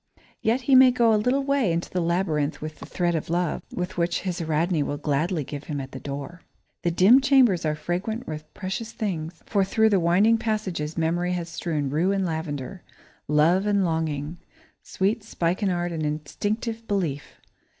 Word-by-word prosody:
Yet 235 +4 +1
he 265 +2 +1
may 260 0 +9
go 235 -2 +3
a - - +5
little 250 +6 +1
way 275 -8 +1
into 170 +1 -2
the 180 - 0
labyrinth 165 -3 0
with 155 0 -7
the - - -9
thread 175 -1 0
of 160 -1 -3
love, 175 -1 0
which 175 -2 -2
his 180 -2 -3
Ariadne 160 +1 +1
will 145 0 -2
gladly 150 +3 0
give 145 +2 -7
him 145 -2 -4
at 135 0 -7
the 130 - -7
door. 140 +5 -7 0.4
The 175 - +1
dim 195 +10 +6
chambers 255 - +4
are 155 - 0
fragrant 180 +9 -3
with 155 -1 -7
precious 205 +4 -4
things, 170 -7 -4
for 200 -2 +1
through 220 +3 +3
the 200 -3 +3
winding 195 +7 +4
passages 195 -9 -2
Memory 175 +2 0
has 175 -1 -3
strewn 155 -5 -2
rue 170 +6 +2
and 195 -1 0
lavender, 160 0 -4 0.5
love 165 +7 +3
and 200 -2 +2
longing; 160 -1 -2 0.4
sweet 205 +3 -1
spikenard 175 -2 -1
and 165 -2 -3
instinctive 210 +10 -3
belief. 170 -9 -2
175 Hz, 175 wpm, -25 LUFS, 155-205 Hz, 0.5 s, may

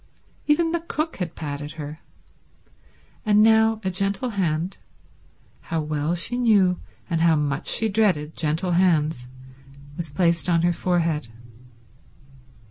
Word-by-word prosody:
Even 325 +2 +3
the 340 - 0
cook 320 -1 -3
had 175 -4 -4
patted 145 0 -5
her. 155 0 -7 1.2
And 210 -1 +4
now 220 0 +4
a 190 - -1
gentle 195 +7 -1
hand—how 170 -2 -5
well 150 +2 -1
she 230 +8 -2
knew 200 -7 +3 0.3
and 165 -3 -1
how 165 -1 +4
much 150 +1 -2
she 225 - +2
dreaded 190 -8 +1
gentle 160 +4 -1
hands—was 140 -3 -2
placed 170 +2 +1
on 165 -1 +3
her 175 0 +3
forehead. 165 -6 0
170 Hz, 120 wpm, -23 LUFS, 150-200 Hz, 1.2 s, And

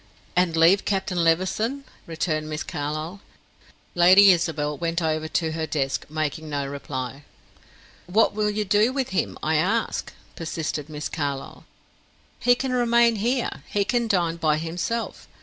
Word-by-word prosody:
"And 175 -2 +2
leave 170 +5 +5
Captain 190 -3 -1
Levison?" 190 +11 +1 0.2
returned 155 -2 -2
Miss 155 -1 -3
Carlyle. 155 +6 -4 0.7
Lady 185 +3 +7
Isabel 155 -4 0
went 165 +2 -1
over 155 -1 -1
to 160 0 -1
her 160 0 -3
desk, 135 -4 -2
making 155 0 -3
no 145 -1 -2
reply. 135 -1 -5 0.8
"What 205 +5 +3
will 210 0 0
you 210 0 -1
do 210 +5 +3
with 265 -1 -2
him, 190 - -1
I 155 0 +2
ask?" 205 +9 0 0.2
persisted 160 -2 -4
Miss 150 -1 -4
Carlyle. 140 -3 -4 0.7
"He 245 0 +4
can 260 +1 -3
remain 235 -2 +3
here 240 +4 -1
he 205 -1 0
can 235 +2 0
dine 175 -5 +1
by 155 -2 +2
himself. 175 +9 -4
170 Hz, 145 wpm, -24 LUFS, 155-210 Hz, 0.8 s, Lady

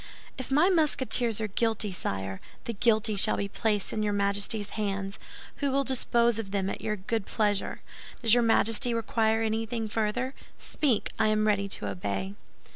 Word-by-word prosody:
"If 260 - -7
my 295 +6 +4
Musketeers 260 - +2
are 220 - -1
guilty, 220 0 0
sire, 95 - -4 0.2
the 235 - -4
guilty 220 0 +2
shall 200 - +3
be 200 - -2
placed 210 0 +1
in 215 - -1
your 210 -1 0
Majesty's 205 +1 0
hands, 200 -2 -3 0.4
who 280 - 0
will 275 +1 +1
dispose 235 -3 +2
of 210 -3 -5
them 195 -1 -1
at - - -6
your 215 - -2
good 215 +1 -3
pleasure. 205 -3 -1 0.4
Does 225 -1 +6
your 245 - +5
Majesty 230 +1 +2
require 225 0 +1
anything 225 +1 -2
further? 225 +4 -1 0.2
Speak, 270 -8 -1
I 220 - +3
am 215 0 +2
ready 205 -2 +1
to 105 - -1
obey." 100 - -3
220 Hz, 170 wpm, -28 LUFS, 200-235 Hz, 0.4 s, Does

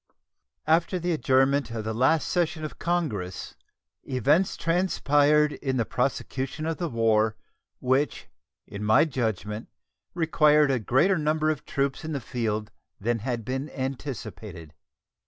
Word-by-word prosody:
After 165 +4 +2
the 175 0 -1
adjournment 140 -3 +2
of 115 -2 -4
the 110 +1 -3
last 130 +7 +2
session 165 -3 0
of 155 - -8
Congress 110 - -2 0.5
events 145 - +1
transpired 150 -4 +2
in 135 -2 -2
the 115 - +1
prosecution 135 +4 -2
of 165 0 -2
the 170 -2 -2
war 110 -2 +2 0.4
which 130 +3 0 0.4
in 100 +1 -7
my 110 +8 +5
judgment 110 - -3 0.5
required 150 -3 +4
a 130 - +1
greater 155 - +2
number 155 +1 +1
of 155 - -5
troops 140 0 -1
in 160 0 -4
the 140 - -1
field 110 -3 -3 0.3
than 115 +3 0
had 120 -1 -3
been 130 +4 -3
anticipated. 130 - -6
135 Hz, 135 wpm, -26 LUFS, 115-155 Hz, 0.5 s, my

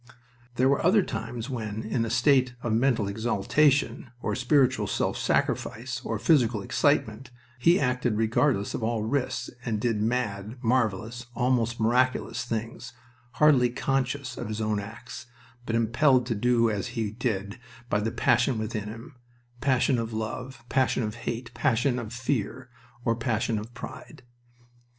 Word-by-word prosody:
There 130 +2 +3
were 140 +1 +2
other 190 +4 +5
times 115 0 -5
when, 110 -4 -4
in 115 +1 -1
a - - -3
state 125 +1 +3
of 120 - 0
mental 115 -3 +2
exaltation, 120 +7 +1
or 110 - -2
spiritual 130 -4 +2
self - - -1
sacrifice, 130 +4 -1
or 115 - -2
physical 115 -3 +3
excitement, 135 -2 +1 0.3
he 170 +8 +5
acted 125 -4 0
regardless 115 0 +1
of - - -3
all 110 -1 -1
risks 125 +4 -2
and 110 -3 -1
did 110 -2 0
mad, 110 -1 -2
marvelous, 115 0 0
almost 120 -2 +1
miraculous 120 0 +1
things, 115 +1 -5 0.4
hardly 140 -5 +5
conscious 135 0 -2
of 120 - -4
his 110 0 -4
own 110 -1 0
acts, 115 +3 -9 0.4
but 115 - 0
impelled 125 +3 +3
to 120 - -1
do 115 +2 +2
as 100 -2 -2
he 110 -3 -1
did 105 -2 -3 0.3
by 105 - +1
the 110 +2 -1
passion 120 +2 +2
within 110 -1 -3
him 115 +4 -9 0.5
passion 130 -1 +2
of 115 0 -3
love, 120 +3 -5
passion 130 -1 +1
of 105 -1 -3
hate, 120 +1 -5
passion 125 -1 +1
of 110 -2 -6
fear, 125 -1 -3 0.3
or 115 - +2
passion 115 -1 -1
of 110 +3 -8
pride. - - -9
120 Hz, 150 wpm, -27 LUFS, 110-130 Hz, 0.5 s, other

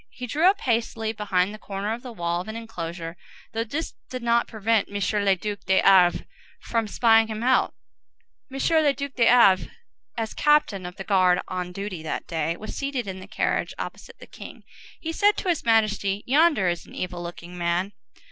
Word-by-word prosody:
He 250 - -7
drew 305 +8 +2
up 400 +1 0
hastily 225 -2 -1
behind 200 -2 0
the 215 - -9
corner 200 +2 -3
of 235 - -6
the 250 -1 -8
wall 175 -4 -2
of 185 - -10
an 220 - -6
enclosure, 170 -7 -6 0.4
though 225 0 0
this 285 +8 -4 0.2
did 255 -1 -6
not 235 0 +2
prevent 220 -1 +1
M. 205 - -11 0.3
le 195 -1 +4
Duc 205 +2 -4
de 190 0 +4
Havré 185 -3 +5 0.3
from 230 -2 -1
spying 225 +1 +4
him 220 0 -5
out. 260 +1 +2 0.8
M. 270 - -6 0.3
le 285 -2 +3
Duc 280 -1 -5
de 235 -2 +3
Havré, 210 -6 +5 0.5
as 225 -1 -3
captain 260 -11 +2
of 180 - -9
the 195 - -7
guard 185 -2 +3
on 180 -1 -4
duty 195 -2 -5
that 160 - -4
day, 165 +1 -2
was 215 - -7
seated 275 -4 -3
in 190 -1 -6
the 185 - -11
carriage, 215 - -1
opposite - - -8
the - - -12
king. - - -12 0.4
He 325 - -4
said 410 +4 +3
to 375 - -2
his 340 - 0
Majesty, 210 -3 +1
"Yonder 290 - +3
is 175 -1 -2
an - - -13
evil 180 -1 -4
looking 175 0 -8
man." 175 +3 -1
210 Hz, 195 wpm, -25 LUFS, 185-235 Hz, 0.8 s, Havré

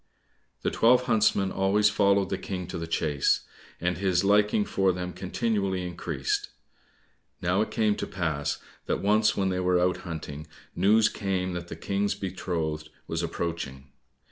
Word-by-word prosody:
The - - +1
twelve 125 +2 +4
huntsmen 105 -4 +2
always 105 +2 +3
followed 100 -2 +3
the 95 - 0
King 95 -1 -4
to 85 - -4
the 85 - -4
chase, 75 -4 +1 0.4
and 90 0 -1
his 95 -2 +2
liking 105 +1 +3
for 95 -1 +2
them 90 0 -4
continually 95 -2 -1
increased. 85 -6 -2 0.9
Now 90 +3 +1
it 110 - -1
came 110 -2 +1
to - - -3
pass 75 -6 -2 0.3
that - - 0
once 105 +2 +3
when 95 -1 +1
they 90 0 -1
were 90 -1 +2
out 90 +1 +2
hunting, 80 -4 -7 0.3
news 105 +4 +5
came 95 -2 -2
that 85 0 -5
the 80 - -6
King's 100 +4 -1
betrothed 85 -5 -3 0.2
was 80 0 -2
approaching. 80 -6 -4
90 Hz, 155 wpm, -27 LUFS, 85-100 Hz, 0.9 s, news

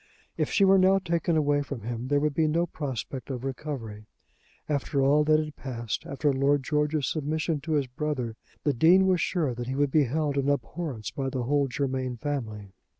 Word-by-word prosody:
If - - -1
she 200 - +4
were 195 0 +6
now 190 +1 +5
taken 170 -3 0
away 145 -1 +2
from 140 -4 -6
him 120 +3 -4
there 145 +1 +2
would 150 0 0
be 160 +1 +2
no 165 +3 +2
prospect 135 -5 -5
of 130 -2 -4
recovery. 125 -6 -5 0.6
After 140 -1 0
all 145 +2 +4
that 155 0 +5
had 155 -1 -4
passed, 120 +2 -5
after 145 -1 0
Lord 140 +1 +2
George's 150 0 0
submission 155 +2 -1
to 160 +3 -3
his 145 -3 +2
brother, 125 -3 -3 0.3
the 145 - +2
Dean 175 +9 +5
was 185 -2 +3
sure 155 -9 0
that 120 0 -5
he 130 - -2
would 145 0 +1
be 150 -1 +4
held 145 +2 0
in 140 +1 0
abhorrence 145 -5 -3
by 135 -1 -3
the 130 -2 -2
whole 140 +2 +2
Germain 130 -1 -2
family. 110 -8 -4
145 Hz, 200 wpm, -27 LUFS, 130-155 Hz, 0.6 s, were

